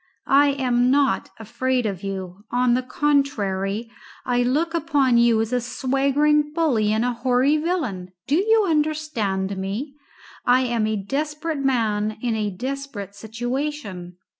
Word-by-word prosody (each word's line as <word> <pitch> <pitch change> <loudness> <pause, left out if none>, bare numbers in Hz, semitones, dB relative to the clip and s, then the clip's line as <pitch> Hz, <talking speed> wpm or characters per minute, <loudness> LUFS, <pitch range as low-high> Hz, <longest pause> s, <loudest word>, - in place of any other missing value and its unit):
I 285 +1 +5
am 250 -2 +1
not 270 -7 +2
afraid 245 +3 -1
of 195 -4 -3
you. 190 -1 -6
On 245 0 +2
the 250 - +2
contrary, 230 -7 0 0.3
I 245 -1 +1
look 300 +7 +1
upon 285 -7 +2
you 235 -2 +4
as 225 +2 -3
a 250 - +1
swaggering 275 +4 +1
bully 255 -11 +2
and 220 +2 +1
a 245 - 0
hoary 255 +4 +2
villain. 260 - -2
Do 280 - -2
you 435 +2 +3
understand 295 - -1
me? 210 +10 -4 0.5
I 250 +1 +4
am 235 -4 0
a 215 - 0
desperate 300 - -3
man 215 -5 0
in 235 -1 -1
a 210 -1 -1
desperate 245 -2 -5
situation. 225 -4 -5
245 Hz, 140 wpm, -23 LUFS, 215-285 Hz, 0.5 s, I